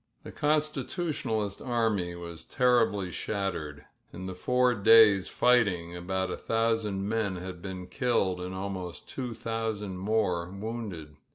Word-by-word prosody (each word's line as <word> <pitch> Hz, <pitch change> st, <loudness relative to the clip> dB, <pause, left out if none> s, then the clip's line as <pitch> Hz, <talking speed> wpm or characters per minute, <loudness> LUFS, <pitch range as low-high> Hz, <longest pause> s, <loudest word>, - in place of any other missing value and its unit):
The -, -, -8 dB
Constitutionalist 150 Hz, -, -1 dB
army 110 Hz, -8 st, 0 dB
was 85 Hz, -1 st, -8 dB
terriUy 115 Hz, -7 st, +2 dB
shattered, 80 Hz, -9 st, -3 dB, 0.3 s
the 95 Hz, +1 st, -6 dB
four 125 Hz, +6 st, +2 dB
days' 105 Hz, -2 st, +6 dB
fighting 95 Hz, -9 st, +2 dB
about 95 Hz, +1 st, -2 dB
a -, -, -3 dB
thousand 115 Hz, -3 st, 0 dB
men 110 Hz, -3 st, 0 dB
had 90 Hz, 0 st, -7 dB
I 100 Hz, -, -4 dB
IdDed 95 Hz, +1 st, 0 dB
and 90 Hz, +1 st, -5 dB
afanost 95 Hz, -2 st, -5 dB
two 125 Hz, -4 st, -5 dB
thousand 110 Hz, -4 st, -3 dB
more 95 Hz, -4 st, 0 dB
wounded. 100 Hz, -6 st, -6 dB
100 Hz, 120 wpm, -29 LUFS, 90-115 Hz, 0.3 s, days